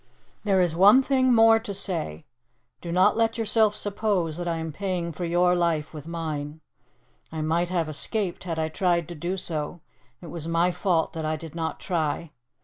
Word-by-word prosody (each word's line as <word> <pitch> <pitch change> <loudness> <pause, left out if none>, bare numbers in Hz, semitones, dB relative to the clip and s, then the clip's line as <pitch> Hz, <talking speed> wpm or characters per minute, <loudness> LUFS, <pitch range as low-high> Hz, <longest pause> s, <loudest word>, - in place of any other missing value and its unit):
"There 195 -2 +2
is 175 -3 +2
one 205 +9 +7
thing 260 -1 +2
more 225 -1 +6
to 215 -3 -6
say. 165 - -3 0.6
Do 170 - -5
not 185 +4 +4
let 225 0 +1
yourself 220 -1 +2
suppose 200 -6 -1
that 175 0 -4
I 170 - 0
am 160 0 -4
paying 180 0 -3
for 175 +3 -5
your 175 +1 +3
life 170 -4 0
with 155 0 -9
mine. 155 -2 -4 0.7
I 160 -1 -4
might 165 +3 0
have 170 -3 0
escaped 180 +5 -2
had 165 -3 -3
I 160 0 0
tried 170 0 0
to - - -5
do 175 +4 -3
so 165 -2 -4 0.4
it 170 -4 -10
was 165 -2 -5
my 170 +2 +2
fault 175 -2 0
that 160 - -4
I 155 0 -1
did 160 0 -9
not 165 -1 -3
try. 165 -3 -2
175 Hz, 190 wpm, -25 LUFS, 160-195 Hz, 0.7 s, one